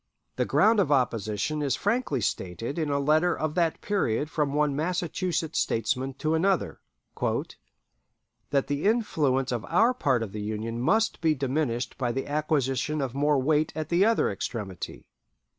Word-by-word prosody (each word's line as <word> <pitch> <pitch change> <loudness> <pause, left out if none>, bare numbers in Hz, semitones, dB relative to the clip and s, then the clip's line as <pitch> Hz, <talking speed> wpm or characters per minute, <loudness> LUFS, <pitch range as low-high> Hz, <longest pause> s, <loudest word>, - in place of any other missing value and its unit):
The - - 0
ground 220 0 +4
of 155 -7 +2
opposition 120 +1 0
is 140 -2 +1
frankly 205 - 0
stated 110 - -3
in 155 -2 -1
a 140 - +1
letter 155 +5 +2
of 155 -1 -2
that 170 -2 0
period 150 - 0
from 150 -3 0
one 150 -1 +1
Massachusetts 170 0 -1
statesman 130 +4 -1
to 155 +3 -1
another 185 +3 +1 1.7
"that 140 -1 +1
the 145 +3 -2
influence 150 - +1
of 120 -3 -2
our 230 +4 +3
part 135 - +1
of 105 - -6
the 105 +1 -5
Union 110 +2 -3
must 220 - +1
be 160 -2 +3
diminished 130 -3 -2
by 125 -2 0
the 135 +2 -3
acquisition 150 0 0
of 135 -4 -2
more 145 +1 +2
weight 150 +3 +2
at 155 -1 -4
the 175 +3 +3
other 225 - +3
extremity." 100 -2 -5
145 Hz, 160 wpm, -27 LUFS, 125-160 Hz, 1.7 s, ground